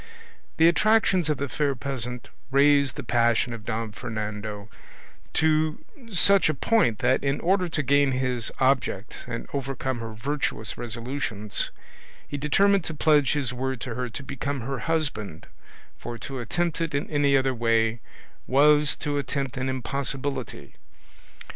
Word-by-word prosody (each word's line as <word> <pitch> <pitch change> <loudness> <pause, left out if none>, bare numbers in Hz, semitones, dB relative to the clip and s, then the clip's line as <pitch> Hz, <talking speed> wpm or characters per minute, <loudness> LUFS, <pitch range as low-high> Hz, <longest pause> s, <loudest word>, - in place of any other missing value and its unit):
The 165 - +6
attractions 190 -2 +3
of 150 - +1
the 140 - -2
fair 140 0 0
peasant 125 -2 -4 0.2
raised 140 -1 +4
the - - -5
passion 120 0 +2
of 115 -2 -8
Don 115 -1 -3
Fernando 105 -1 -5 0.7
to 155 0 +1 0.3
such 195 -1 +5
a 155 - 0
point 170 - +2
that, 130 - +3
in 140 0 0
order 185 0 +1
to 155 -2 -1
gain 140 0 +3
his 125 -3 -1
object 130 -6 0
and 115 -1 -5
overcome 135 -2 -3
her 115 -1 -6
virtuous 135 -2 -2
resolutions, 115 -2 -3 0.6
he - - -5
determined 195 +6 +3
to 160 - -4
pledge 150 -2 +3
his 140 -4 -1
word 130 0 -3
to 125 - -4
her 125 +1 -3
to 140 - -7
become 135 0 -4
her 135 +2 -3
husband, 145 - -2 0.5
for 120 0 -6
to 135 +3 -6
attempt 170 +7 -1
it 165 -3 -1
in 140 - -1
any 145 -2 +3
other 135 0 +1
way 115 -1 +1 0.5
was 150 +2 +4
to 145 -2 -2
attempt 135 0 -3
an 130 0 -2
impossibility. 130 - -4
135 Hz, 150 wpm, -26 LUFS, 120-145 Hz, 0.7 s, The